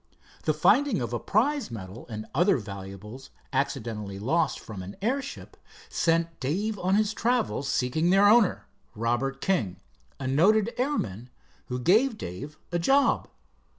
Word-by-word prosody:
The 155 - +3
finding 245 - +3
of 120 -1 -3
a 120 - -1
prize 275 - +1
medal 105 0 -8
and 110 -1 -5
other 185 +1 +4
valuables 100 +3 -8 0.2
accidentally 115 -7 -2
lost 155 +9 0
from 105 -4 -8
an 95 +2 -8
airship, 260 +7 -3 0.3
sent 165 0 0
Dave 200 +10 -1
on 185 +2 +2
his 215 0 +2
travels 230 - 0
seeking 155 +7 +1
their 195 +2 +6
owner, 215 -2 +4 0.3
Robert 120 +5 -1
King, 110 - 0 0.4
a 135 - -5
noted 200 - +3
airman, 125 - -2 0.4
who 125 - -3
gave 215 - +3
Dave 145 - -7
a 175 - 0
job. 275 +10 +3
155 Hz, 140 wpm, -27 LUFS, -, 0.4 s, their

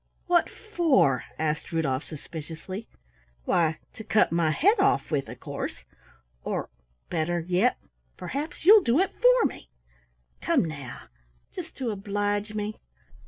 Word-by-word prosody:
"What 350 -1 +3
for?" 325 - +2
asked 155 -1 -2
Rudolf 150 -4 0
suspiciously. 165 +6 -8 0.6
"Why, 160 -2 +2 0.2
to 220 - -9
cut 220 - +3
my 165 -1 +2
head 390 - +3
off 400 - +2
with, 140 -3 -1
of - - -9
course, - - -5 0.6
or - - -3 0.4
better 175 +2 0
yet, 185 +8 +2 0.4
perhaps 300 +5 -5
you'll 420 +3 +9
do 240 -4 +2
it 385 - +2
for - - +5
me. - - -4 0.7
Come, - - +2
now! 145 -6 -7 0.5
Just 335 -3 -8
to 250 -4 -2
oblige 205 +1 -2
me?" 210 0 -3
205 Hz, 130 wpm, -27 LUFS, -, 0.7 s, you'll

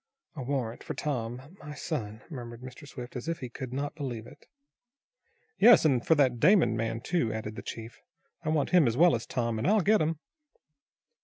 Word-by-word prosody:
"A 140 - -5
warrant 125 -3 -3
for 155 - -5
Tom 130 +2 -4
my 150 0 -9
son," 110 -8 -5
murmured 120 -6 -8
Mr. 130 +3 -10
Swift, 125 -3 -9
as 125 +4 -5
if 165 0 -1
he 125 - -7
could 125 +1 -7
not 140 +3 -3
believe 130 -7 -5
it. - - -16 1.1
"Yes, 230 -6 +7
and 130 -6 +3
for 160 - +4
that 130 -5 +2
Damon 155 - +5
man, 115 +1 -2
too," 165 -6 0
added 110 0 -5
the - - -6
chief. 115 0 -8 0.4
"I - - -2
want 155 -2 0
him 175 -7 +5
as 115 +1 0
well 175 +2 +6
as 115 0 -2
Tom, 115 -3 -1
and 110 - -1
I'll 210 +1 +4
get 210 +2 +3
'em." 160 +1 0
130 Hz, 200 wpm, -29 LUFS, 115-155 Hz, 1.1 s, Yes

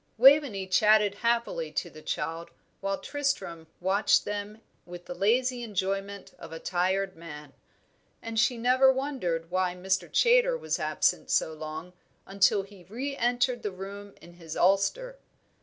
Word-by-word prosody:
Waveney 260 -6 +5
chatted 210 +2 +4
happily 230 -8 -1
to - - -2
the 155 - -12
child, 165 +2 -4 0.3
while 195 0 -2
Tristram 275 - -3
watched 190 +3 +2
them 205 +1 -5 0.2
with 175 0 -11
the - - -6
lazy 245 +6 +1
enjoyment 195 -2 -3
of 165 - -10
a 165 - -6
tired 190 +2 -1
man; 150 -4 -10 0.7
and 225 -1 -3
she 245 +1 +2
never 255 +3 +4
wondered 215 - -3
why 185 -1 0
Mr. 190 +1 -1
Chaytor - - +4
was - - -2
absent - - 0
so 160 - +1
long 155 +3 -7 0.3
until 195 +1 +2
he 195 -2 -15
re 265 +7 -5
entered 245 0 0
the 210 - -2
room 200 +2 -9
in 175 - -15
his 165 -2 -9
ulster. 470 - +1
195 Hz, 145 wpm, -28 LUFS, 180-245 Hz, 0.7 s, Waveney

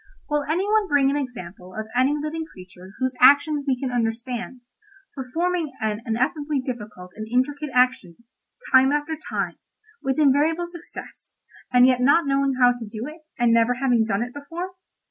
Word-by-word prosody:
"Will 295 -1 0
any 350 +5 +1
one 430 -1 +2
bring 280 -4 +3
an - - -1
example 185 -9 -6
of 220 0 -4
any 265 +4 +3
living 305 +2 -3
creature 185 - -14
whose 260 0 -1
action 285 +2 +5
we 260 -2 +1
can 260 -1 -3
understand, 240 +1 -3 0.5
performing 325 +4 -2
an 215 -1 -2
ineffably 275 +6 0
difficult 210 -8 -7
and 215 0 -6
intricate 285 +4 0
action, 250 -9 +2 0.6
time 265 +1 +6
after 295 +2 -1
time, - - -3 0.4
with 265 +1 -1
invariable 305 +4 +3
success, 345 0 -9 0.4
and 250 0 +6
yet 255 -1 +3
not 285 +6 +4
knowing 275 -1 +1
how 245 -1 +6
to 245 -1 -6
do 220 +2 -6
it, 310 +3 -9 0.2
and 240 -2 +3
never 230 +2 +3
having 245 -3 +2
done 220 0 0
it 245 +1 -7
before? 335 +6 -6
260 Hz, 165 wpm, -23 LUFS, 235-295 Hz, 0.6 s, time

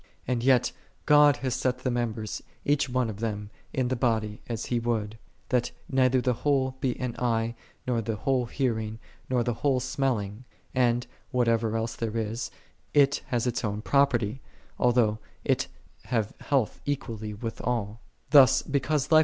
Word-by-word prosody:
And 120 -1 0
yet, 130 -2 +4 0.3
"God 145 -1 +6
hath 130 - +1
set 130 +1 0
the 130 - +1
members, 115 -3 -2 0.2
each 140 -1 +2
one 125 -1 +1
of 105 -2 -6
them, 105 -2 -3 0.2
in 130 -2 0
the 130 - +1
body, 110 -4 0
as 115 -1 -3
He 120 - 0
would 110 -2 -2
;" - - -37
« - - -37
that 125 -1 +2 0.2
neither 130 -1 +3
the 125 0 +2
whole 135 -3 +2
be 125 -2 -1
an 125 -2 -3
eye, 115 -1 +1 0.3
nor 120 -2 +1
the 110 0 -2
whole 130 +1 0
hearing, 110 -4 -1 0.3
nor 125 -2 +2
the 120 0 0
whole 135 +2 +1
smelling: 125 -4 -1 0.3
and, 120 -1 +2 0.2
what 125 -1 +1
ever 115 -1 +2
else 115 0 -2
there 115 -1 -3
is, 115 +2 -2 0.5
it 145 0 +5
hath 120 -1 0
its 125 -1 -1
own 105 0 -2
property, 130 -4 +2 0.4
although 120 -3 +3 0.2
it - - +1 0.4
have 110 -4 -1
health 135 -6 0
equally 110 -6 -3
with 115 +2 -5
all. 115 -2 -2
120 Hz, 160 wpm, -27 LUFS, 110-130 Hz, 0.5 s, God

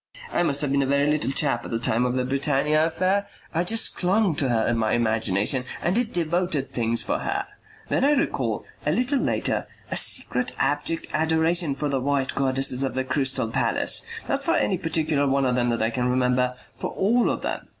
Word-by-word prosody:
I - - +1
must 145 -5 +1
have 145 -2 0
been 140 0 +2
a 135 - 0
very 140 +1 +2
little 150 -1 +1
chap 135 -4 0
at - - -8
the 115 - -1
time 115 +1 +1
of 125 - -2
the 130 -1 0
Britannia 145 +3 +2
affair. 190 +4 0 0.3
I 170 +1 +1
just 225 +5 +2
clung 190 0 +2
to 135 - +1
her 115 -2 +1
in 120 - +1
my 110 -1 0
imagination 110 +1 +1 0.2
and 175 - 0
did 235 +1 0
devoted 170 -4 -1
things 115 -1 0
for 295 +2 -1
her. 400 0 -2 0.4
Then - - 0
I 290 +2 +4
recall, 280 - -1 0.2
a - - +1
little 255 +3 +1
later, 115 - -1 0.2
a - - 0
secret 125 0 0
abject 145 +4 -1
adoration 160 0 +1
for 145 +2 -2
the 135 -2 -1
white 140 0 0
goddesses 135 -1 +1
of 135 - -2
the 130 - 0
Crystal 130 -3 0
Palace. - - +1 0.2
Not - - -1
for - - +1
any 105 - +1
particular 155 -3 0
one 135 0 +1
of 125 - +1
them 120 -1 +1
that 115 -1 0
I 115 - 0
can 125 +1 -1
remember, 125 0 +1 0.2
for - - -3
all 230 +5 +1
of - - -3
them. - - -4
140 Hz, 210 wpm, -24 LUFS, 125-165 Hz, 0.4 s, I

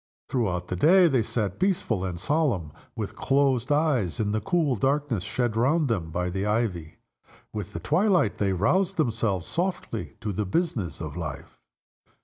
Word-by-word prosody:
Throughout 95 -9 -1
the 90 - -2
day 175 - +6
they 135 -6 +2
sat 105 -3 -2
peaceful 175 - 0
and 90 -2 -3
solemn, 125 - 0 0.2
with - - -4
closed 135 -2 +1
eyes, 145 - +1
in 105 -2 0
the 110 0 0
cool 155 - +1
darkness 135 -2 0
shed 120 +4 -1
round 140 +7 +2
them 90 -8 -1
by 90 +2 -2
the 95 +2 -2
ivy. 105 -7 -1 0.6
With 105 -2 -5
the 85 - -4
twilight 175 - +2
they 100 -2 +2
roused 175 - +1
themselves 110 - 0
softly 175 - -3
to 105 -3 -2
the 105 +3 -1
business 105 - -1
of - - -5
life. - - -6
115 Hz, 160 wpm, -26 LUFS, 95-150 Hz, 0.6 s, day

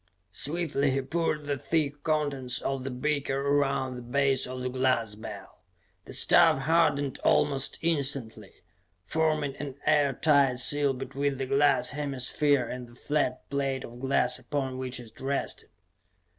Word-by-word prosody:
Swiftly 145 - 0
he 135 +1 0
poured 155 +1 -2
the 145 -1 -2
thick 145 -2 0
contents 145 -5 0
of 135 -1 -3
the 135 - -3
beaker 135 +1 -1
around 140 -2 0
the 125 - -7
base 135 +2 +1
of 130 0 -6
the 125 - -2
glass 130 -4 0
bell. 105 - -10 0.5
The - - -10
stuff - - +5
hardened 145 -1 +1
almost 140 -2 +2
instantly, 135 - -2 0.4
forming 155 +1 0
an 140 -3 -6
air 145 -3 +3
tight 140 -2 +3
seal 140 +2 +3
between 135 +2 -3
the 135 - -2
glass 140 +2 +2
hemisphere 140 -1 +1
and 125 0 -6
the 120 - -17
flat 135 -1 -2
plate 135 -2 -1
of 120 +1 -10
glass 130 -1 +2
upon 135 -3 -3
which 130 -1 -3
it 115 -2 -13
rested. 135 +1 -3
135 Hz, 145 wpm, -28 LUFS, 130-145 Hz, 0.5 s, stuff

